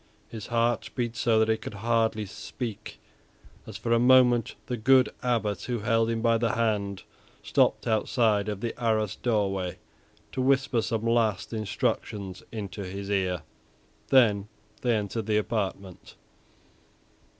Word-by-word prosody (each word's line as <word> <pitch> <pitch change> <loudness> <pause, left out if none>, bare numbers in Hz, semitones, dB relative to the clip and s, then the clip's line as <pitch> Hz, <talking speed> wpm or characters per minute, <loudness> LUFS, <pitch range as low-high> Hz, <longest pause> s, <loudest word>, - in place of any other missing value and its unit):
His 110 -3 -7
heart 115 -1 0
beat 120 -2 -2
so 115 -2 +2
that 110 0 +4
he 110 0 +2
could 110 - -8
hardly 110 0 0
speak 110 +2 -7 0.7
as, - - -7
for 115 - -1
a 115 - +4
moment, 125 -2 +5
the 125 - -3
good 130 +3 +4
Abbot 115 -5 0
who 120 -3 -2
held 115 0 +2
him 115 -1 -2
by 115 -1 +3
the 115 -1 +1
hand 105 -4 -1 0.4
stopped - - +2
outside 110 -1 +1
of 105 -2 -4
the 115 - -2
arrased 110 -3 0
doorway 95 -6 0 0.5
to 130 - -2
whisper 135 -2 +2
some 115 0 -2
last 115 -2 +1
instructions 100 -2 -2
into 100 -3 -5
his 100 +2 -6
ear. 95 -3 0 0.6
Then 105 -6 +4 0.3
they 120 -2 +2
entered 105 +1 -3
the 105 -1 +2
apartment. 100 -4 -3
110 Hz, 140 wpm, -27 LUFS, 105-120 Hz, 0.7 s, moment